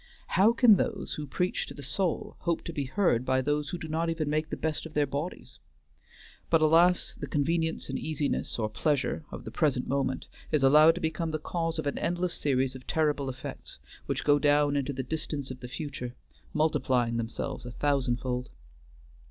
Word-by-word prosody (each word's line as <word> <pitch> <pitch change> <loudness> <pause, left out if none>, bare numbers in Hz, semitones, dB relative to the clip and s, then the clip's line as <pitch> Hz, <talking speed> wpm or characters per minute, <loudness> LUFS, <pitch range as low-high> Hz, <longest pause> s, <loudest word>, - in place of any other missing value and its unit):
How 200 +4 +5
can 235 -3 +6
those - - -2
who 150 -1 -5
preach 180 +6 -1
to - - -8
the 145 - -9
soul 170 +6 -1
hope 170 -2 -1
to 170 - -6
be 145 -3 -2
heard 135 - +2
by 130 0 +2
those 145 +2 0
who 180 - -3
do 160 - -7
not 165 +2 -1
even 160 -3 -1
make 155 +1 0
the - - -3
best 160 0 -2
of 160 - -17
their 150 -1 +3
bodies? 145 +6 -5 0.9
but 165 - +5
alas, 165 +3 +4
the - - -4
convenience 160 +2 0
and - - -3
easiness, 150 -2 -1
or 110 -2 0
pleasure, 145 +6 0
of - - -8
the - - -6
present 140 -6 +1
moment 135 -1 -1 0.3
is 150 -3 +2
allowed 150 +4 +7
to - - -5
become 160 +1 -1
the 155 - -1
cause 165 +1 -2
of 160 - -2
an 145 - -1
endless 175 0 0
series 130 -2 +1
of 130 -1 -11
terrible 150 -3 +1
effects, 130 0 -7 0.3
which - - -1
go 145 0 +4
down 145 0 +3
into 140 0 0
the 130 -1 -3
distance 145 -1 -3
of 130 - -8
the 125 - -7
future, 125 -3 -5 0.4
multiplying 130 -6 +1
themselves 115 +4 -4
a - - -6
thousandfold. 125 -2 -1
150 Hz, 195 wpm, -29 LUFS, 130-160 Hz, 0.9 s, allowed